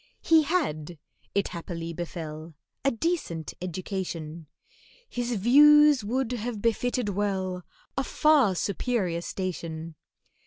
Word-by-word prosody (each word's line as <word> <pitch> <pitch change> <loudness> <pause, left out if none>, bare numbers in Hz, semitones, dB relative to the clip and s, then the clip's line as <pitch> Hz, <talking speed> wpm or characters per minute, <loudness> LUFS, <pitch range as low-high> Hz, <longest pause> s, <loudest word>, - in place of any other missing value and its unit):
(He'd 320 -2 +5
had, 175 - -1 0.4
it 200 - +1
happily 170 -1 -6
befell, 160 -2 -6 0.3
A 275 - +4
decent 235 - -2
education, 170 -3 -5 0.6
His 245 - -2
views 295 +5 +6
would 250 +3 -1
have 235 -2 -3
befitted 235 +1 0
well 190 -2 -1 0.3
A 270 - 0
far 280 -10 +3
superior 190 -3 -1
station.) 165 -3 -5
200 Hz, 105 wpm, -27 LUFS, 170-250 Hz, 0.6 s, views